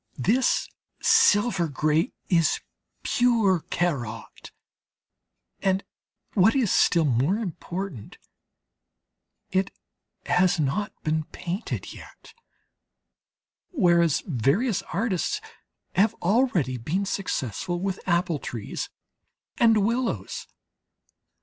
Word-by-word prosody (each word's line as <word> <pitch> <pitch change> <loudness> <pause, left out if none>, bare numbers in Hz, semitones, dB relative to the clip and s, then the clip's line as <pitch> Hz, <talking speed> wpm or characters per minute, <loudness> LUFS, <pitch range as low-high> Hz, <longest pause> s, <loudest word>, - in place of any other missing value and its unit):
This 230 - +2 0.3
silver 205 -4 +4
grey 155 - +1 0.2
is 170 -4 +2 0.4
pure 230 -7 +3
Corot, 120 -11 -3 1.1
and 190 0 +1 0.5
what 210 +4 +4
is 245 -8 +2
still 165 -2 +4
more 135 - +2
important, 180 - -5 1.3
it 190 +1 +1 0.6
has 180 0 +3
not 180 +9 0
been 155 0 0
painted 185 +7 -5
yet; - - -14 1.4
whereas 170 - +3
various 170 - +1
artists 200 - -1 0.5
have 205 +3 +3
already 180 - +1
been 165 +12 -2
successful 175 - -2
with 190 0 -2
apple 170 -3 +1
trees 115 -6 -5 0.7
and 225 -3 +5
willows. 235 +2 -2
180 Hz, 85 wpm, -25 LUFS, 155-210 Hz, 1.4 s, and